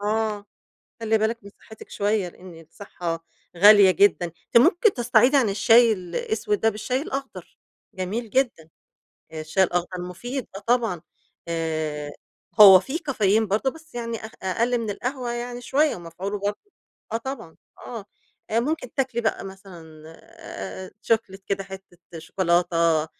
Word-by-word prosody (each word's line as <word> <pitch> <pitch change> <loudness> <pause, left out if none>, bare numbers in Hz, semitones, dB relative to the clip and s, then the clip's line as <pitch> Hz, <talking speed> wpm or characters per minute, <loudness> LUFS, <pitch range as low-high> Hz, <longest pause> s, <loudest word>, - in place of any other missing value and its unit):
آه. 210 0 -1 0.6
خلّي 225 -1 +1
بالِك 220 +2 0
من 200 - -11
صحّتِك 220 -1 -14
شوية، 205 -2 0
لإن 175 -1 -13
الصحّة 165 0 -6 0.3
غالية 205 +1 +8
جدًا. 185 -1 +3
أنتِ 165 +5 -8
ممكن 350 - +5
تستعيضي 245 +2 +3
عن 255 -6 +3
الشاي 225 +4 +5
الأسود 210 +3 -2
ده 225 - +3
بالشاي 225 +5 -2
الأخضر، 275 -2 -7 0.4
جميل 210 +5 -4
جدًا. 240 -11 0 0.7
الشاي 160 +4 0
الأخضر 175 0 -2
مفيد 240 +9 -6
آه - - -5
طبعًا. 225 -5 0 0.5
آآ 155 -3 -3 0.5
هو 195 -3 +11
فيه 270 - -4
كافيين 220 -5 +2
برضه 215 +7 0
بس 320 -3 -17
يعني 230 -1 -4
أ - - -6 0.2
أقَل 235 +6 0
من 230 -2 -4
القهوة 250 +4 -4
يعني 240 +1 -5
شوية، 290 +5 +1
ومفعوله 180 +4 -6
بر 200 +1 -1 0.6
آه 225 - 0
طبعًا، 230 -9 -7 0.2
آه. 230 -5 -8 0.4
أ 225 - +2
ممكن 280 0 -3
تاكلي 260 -3 -1
بقى 220 -3 -1
مثلًا 190 -3 -11 1.0
أ - - -11 0.2
chocolate 195 -3 -4
كده 195 0 -1
حتّة 190 -2 -12 0.2
شوكولاتة، 170 -2 +1
210 Hz, 140 wpm, -24 LUFS, 180-240 Hz, 1.0 s, هو